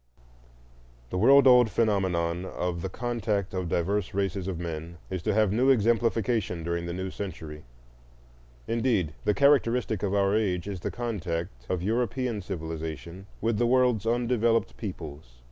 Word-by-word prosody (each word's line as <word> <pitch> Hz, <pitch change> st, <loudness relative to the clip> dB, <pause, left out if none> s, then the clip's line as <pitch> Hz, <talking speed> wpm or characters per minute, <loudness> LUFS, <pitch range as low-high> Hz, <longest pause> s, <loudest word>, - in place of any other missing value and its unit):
The -, -, -2 dB
world 135 Hz, +6 st, +7 dB
old 125 Hz, -3 st, +7 dB
phenomenon 95 Hz, -6 st, 0 dB
of 90 Hz, -2 st, -3 dB
the 95 Hz, -, -3 dB
contact 110 Hz, -3 st, -2 dB
of 90 Hz, -2 st, -2 dB
diverse 95 Hz, +3 st, -1 dB
races 95 Hz, -1 st, -1 dB
of 95 Hz, -3 st, -3 dB
men 85 Hz, 0 st, -6 dB
is 95 Hz, -2 st, -2 dB
to 105 Hz, +5 st, 0 dB
have 110 Hz, -3 st, +3 dB
new 125 Hz, +6 st, +3 dB
exemplification 115 Hz, -5 st, +1 dB
during 85 Hz, +1 st, -2 dB
the -, -, -3 dB
new 95 Hz, +1 st, -4 dB
century. 80 Hz, -7 st, -7 dB, 1.0 s
Indeed, 115 Hz, -, +1 dB
the 105 Hz, -, +2 dB
characteristic 125 Hz, -7 st, +3 dB
of 100 Hz, -1 st, 0 dB
our 100 Hz, 0 st, +2 dB
age 95 Hz, -5 st, 0 dB
is 100 Hz, -3 st, -4 dB
the -, -, -3 dB
contact 85 Hz, -, -4 dB
of 90 Hz, -2 st, -1 dB
European 120 Hz, +1 st, -1 dB
civilization 80 Hz, 0 st, -6 dB
with 110 Hz, -1 st, 0 dB
the 120 Hz, -, +3 dB
world's 125 Hz, -4 st, +2 dB
undeveloped 115 Hz, -1 st, +1 dB
peoples. 75 Hz, -, -8 dB
100 Hz, 145 wpm, -27 LUFS, 85-115 Hz, 1.0 s, world